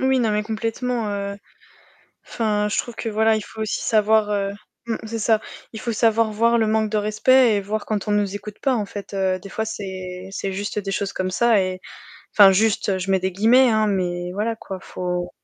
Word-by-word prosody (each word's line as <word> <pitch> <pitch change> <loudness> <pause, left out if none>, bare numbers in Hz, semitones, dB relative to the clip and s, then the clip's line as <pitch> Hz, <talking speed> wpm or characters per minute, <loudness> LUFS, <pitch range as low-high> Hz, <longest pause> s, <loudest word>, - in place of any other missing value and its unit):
Oui, 265 0 +2
non, 225 -2 +1
mais 210 0 0
complètement, 225 +1 -2
heu. 200 0 -4 0.9
Enfin, 210 -2 0
je - - -1
trouve 240 -2 -3
que - - -5
voilà, 220 0 +2
il - - -3
faut 220 +2 -9
aussi 215 - -2
savoir, 215 -1 +3
heu, 200 -1 0 0.4
mmh, 225 - -1
c'est 225 +1 -4
ça, 220 0 +3 0.3
il 220 - -7
faut 235 +1 -3
savoir 225 0 +2
voir 230 +2 +3
le 220 -1 +2
manque 220 0 +1
de 215 - +1
respect 220 +3 +4
et 200 - 0
voir 210 +2 -3
quand 210 -1 -2
on - - +2
nous 205 -1 0
écoute 210 0 -8
pas, 265 -3 +1
en 210 -3 -1
fait, 200 0 -8
heu, 190 -1 0
des 195 - -10
fois, 220 +3 -3
c'est 190 -3 -6
c'est 195 0 -3
juste 205 +2 -3
des 195 -1 -4
choses 200 0 -2
comme 185 0 -2
ça 225 0 +3
et 185 0 -3 0.5
enfin, 200 -2 +8
«juste», 200 -1 +1
je 190 +1 -2
mets 190 - +3
des 190 +1 -1
guillemets, 240 +6 +5
hein, 215 -1 +2
mais 180 -3 -1
voilà, 215 +4 -2
quoi, 190 -3 -8
faut 180 -1 -4
210 Hz, 220 wpm, -22 LUFS, 195-220 Hz, 0.9 s, enfin